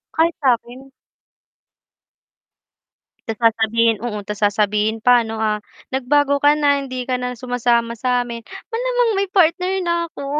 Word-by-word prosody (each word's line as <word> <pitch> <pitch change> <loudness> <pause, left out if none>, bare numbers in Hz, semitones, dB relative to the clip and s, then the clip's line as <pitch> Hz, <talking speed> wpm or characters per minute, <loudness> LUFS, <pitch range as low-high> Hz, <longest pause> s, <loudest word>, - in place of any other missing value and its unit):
Kahit 330 +1 +2
sakin. 255 +1 -1 2.4
'Tas 225 -1 -3
sasabihin 225 0 +2
oo 215 -3 -3
'tas 210 0 -6
sasabihin 210 +1 +1
pa 245 -1 +6
'no, 225 -1 -5
ah, 215 -1 0 0.4
"Nagbago 285 +2 +2
ka 290 - +7
na 285 -1 +2
hindi 255 -2 -5
ka 255 - +1
na 250 0 -4
sumasama 235 -1 0
samin." 245 -1 -2 0.3
Malamang - - +1
may 395 0 0
partner 365 0 +2
na 340 0 +1 0.2
'ko. 280 - -7
245 Hz, 135 wpm, -20 LUFS, 225-290 Hz, 2.4 s, ka